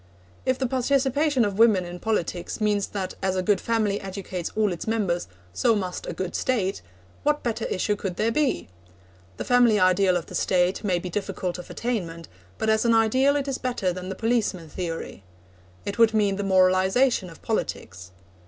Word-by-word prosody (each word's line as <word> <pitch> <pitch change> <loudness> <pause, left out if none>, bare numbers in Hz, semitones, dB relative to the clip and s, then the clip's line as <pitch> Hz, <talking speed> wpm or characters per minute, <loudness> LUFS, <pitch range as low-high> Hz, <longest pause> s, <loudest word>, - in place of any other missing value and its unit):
If 255 0 +2
the 265 - -1
participation 265 +1 +2
of 200 0 -3
women 215 -6 +5
in 175 0 -8
politics 180 -5 -2
means 210 -2 +1
that 190 -2 -4
as 190 -1 0
a 185 - 0
good 200 0 +2
family 215 -3 0
educates 190 -2 -5
all 210 -3 +2
its 170 - -7
members, 200 -6 0 0.3
so 230 - +2
must 185 -3 -4
a - - -2
good 185 -1 -4
State, 200 - -1 0.4
what 295 0 +1
better 230 -1 -2
issue 205 +3 0
could 190 -3 -4
there 225 +4 +1
be? 290 +2 0 0.7
The - - -4
family 245 -4 +4
ideal 185 0 +4
of 170 - -5
the - - -12
State 180 +2 +1
may 185 -4 +1
be 180 +1 -5
difficult 185 -2 -3
of 180 - -10
attainment, 170 -9 -3 0.3
but 220 - -2
as 220 0 +3
an 230 -1 +4
ideal 255 +6 +3
it 285 -1 -1
is 270 -1 -2
better 240 -8 -1
than 185 +1 -6
the 190 - -4
policeman 215 -7 -1
theory. 165 - -5 0.6
It 200 +3 -4
would 225 -1 +5
mean 200 -2 +2
the 200 - -2
moralisation 190 +4 +3
of 165 - -15
politics. 90 - -3
200 Hz, 185 wpm, -25 LUFS, 185-230 Hz, 0.7 s, women